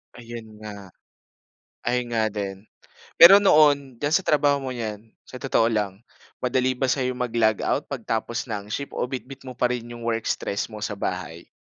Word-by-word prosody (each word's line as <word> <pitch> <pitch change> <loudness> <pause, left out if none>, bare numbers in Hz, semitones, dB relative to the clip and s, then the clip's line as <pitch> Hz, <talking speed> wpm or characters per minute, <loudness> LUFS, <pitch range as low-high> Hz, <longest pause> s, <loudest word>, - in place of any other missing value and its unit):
Ayun 115 -2 -10
nga. 100 -2 -8 1.0
Ayun 125 0 0
nga 110 - +2
din. 100 -2 -5 0.5
Pero 190 +4 +10
noon, 145 -8 +4
diyan 145 +5 -2
sa 190 - +1
trabaho 145 -1 +3
mong 130 -2 -5
yan, 105 -2 -4 0.2
sa 130 - -10
totoo 115 -3 +2
lang. 105 -1 -2 0.4
Madali 130 0 +1
ba 130 0 0
sa'yo 130 -2 0
mag-logout 115 -3 0
pagtapos 115 +1 -3
ng 105 -1 -4
shift 140 +6 -4
o - - -2
bitbit 130 +1 -8
mo 125 - -7
pa 125 0 +1
rin 120 -1 -4
'yung 120 - -10
work 115 -1 -1
stress 100 - -2
mo 110 -2 -8
sa 105 - -3
bahay? 85 -2 -4
120 Hz, 170 wpm, -24 LUFS, 110-130 Hz, 1.0 s, Pero